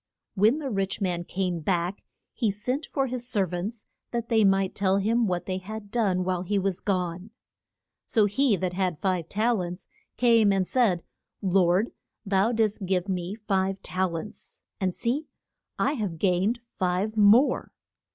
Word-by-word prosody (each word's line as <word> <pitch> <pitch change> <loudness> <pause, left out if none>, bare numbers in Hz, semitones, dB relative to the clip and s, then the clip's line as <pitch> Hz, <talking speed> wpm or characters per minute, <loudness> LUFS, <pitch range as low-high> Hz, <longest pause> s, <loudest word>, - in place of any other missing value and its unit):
When 215 +7 +4
the 285 -4 -4
rich 195 -1 -1
man 175 -3 -1
came 180 -2 -2
back 175 +3 -1 0.3
he 230 -5 0
sent 250 +9 -2
for 270 -2 0
his 250 -1 -5
ser 205 -6 +2
vants 190 +6 -5 0.2
that 235 -1 -3
they 220 -2 +4
might 195 -1 +3
tell 195 -1 +2
him 225 +3 +2
what 180 -2 -2
they 185 -1 -2
had 205 +2 -8
done 195 -6 +1
while 180 -1 -1
he 200 +3 -1
was 195 -1 0
gone. 180 0 -2 0.8
So 220 -3 +3
he 225 +3 +2
that 180 -1 -2
had 185 -1 0
had 150 - -19
five 185 -4 -1
tal 220 0 +1
ents 180 +1 -6 0.3
came 230 -4 +5
and 190 -2 +1
said, 210 -10 +2 0.4
Lord, 185 +2 +3 0.3
thou 195 +3 +2
didst 215 -4 0
give 185 0 0
me 185 0 -2
five 195 -3 -1
tal 185 -2 -1
ents, 210 +6 -9 0.2
and 185 -2 -1
see 265 +6 -1 0.5
I 280 - +1
have 205 - -3
gained 195 +7 +1 0.2
five 185 +3 0
more. 215 +6 +4
195 Hz, 170 wpm, -26 LUFS, 185-220 Hz, 0.8 s, came